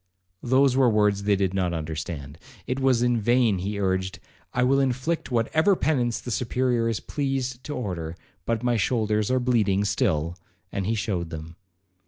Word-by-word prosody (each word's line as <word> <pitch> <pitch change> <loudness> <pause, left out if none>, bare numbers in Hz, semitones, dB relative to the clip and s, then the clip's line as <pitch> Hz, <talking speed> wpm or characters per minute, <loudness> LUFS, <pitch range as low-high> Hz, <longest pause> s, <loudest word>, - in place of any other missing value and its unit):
Those 130 +1 +3
were 130 -2 +5
words 105 -2 +2
they 105 -1 +4
did 95 -1 0
not 90 -3 0
understand. 80 -2 -5 0.3
It 130 +1 -2
was 130 -3 +3
in 120 -2 +2
vain 120 -3 +3
he 100 +3 -3
urged, 95 -1 -1 0.3
'I 125 - +1
will 135 +2 +3
inflict 135 +5 -1
whatever 155 - +2
penance 125 -9 0
the 125 - -6
Superior 120 0 0
is 115 - -1
pleased 135 -3 -3
to 150 - -4
order, 85 - -4 0.3
but 115 0 0
my 120 -1 +2
shoulders 110 -1 +1
are 130 0 +2
bleeding 105 -6 +2
still,'—and 90 +1 -2
he 115 - +1
shewed 95 -6 -2
them. 80 +1 -8
115 Hz, 165 wpm, -25 LUFS, 95-125 Hz, 0.3 s, were